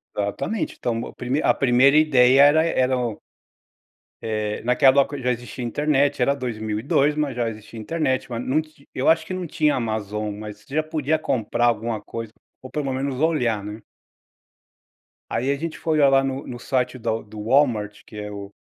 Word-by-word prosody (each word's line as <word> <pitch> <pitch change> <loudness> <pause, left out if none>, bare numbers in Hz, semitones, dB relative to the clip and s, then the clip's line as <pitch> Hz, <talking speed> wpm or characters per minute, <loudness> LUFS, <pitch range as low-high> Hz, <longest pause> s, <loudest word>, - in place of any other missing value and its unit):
Exatamente, 105 - -2
então 120 - -1
meu 115 - -5
primei 130 +5 -2
a - - +3
primeira 135 +2 +4
ideia 135 -4 +5
era 150 +2 +5
eram 125 -7 0 1.0
Eh, 110 -1 -2
naquela 130 +3 +5
época 140 0 -3
já 125 0 0
existia 120 +1 -5
internet, 145 +2 +1
era 140 +3 +3
2002, 120 +3 0
mas 150 -4 -1
já 120 -2 0
existia 110 +1 -10
internet, 130 +1 -1
mas 115 -1 -3
num 150 +4 +2
ti 155 -2 -19
eu 130 - +2
acho 160 0 +3
que 185 - -5
não 185 -1 -3
tinha 150 -2 +1
Amazon, 105 -2 -3
mas 105 -1 -8
você 135 +7 -10
já 155 - +2
podia 155 0 -1
comprar 120 0 0
alguma 115 -1 0
coisa, 115 -2 -7 0.3
ou 130 - -10
pelo 140 -3 -2
menos 130 0 -2
olhar, 125 -10 +1
né? 105 +2 -7 1.5
Aí 130 +4 0
a - - +1
gente 160 +3 -5
foi 160 - -1
olhar 140 -2 +5
lá 135 0 +4
no 135 0 -3
no 120 -1 -7
site 130 +1 -1
da 115 -1 -1
do 105 0 -10
Walmart, 115 -5 +1
que 105 - -12
é 105 0 -6
o 100 0 -8
130 Hz, 185 wpm, -23 LUFS, 110-145 Hz, 1.5 s, ideia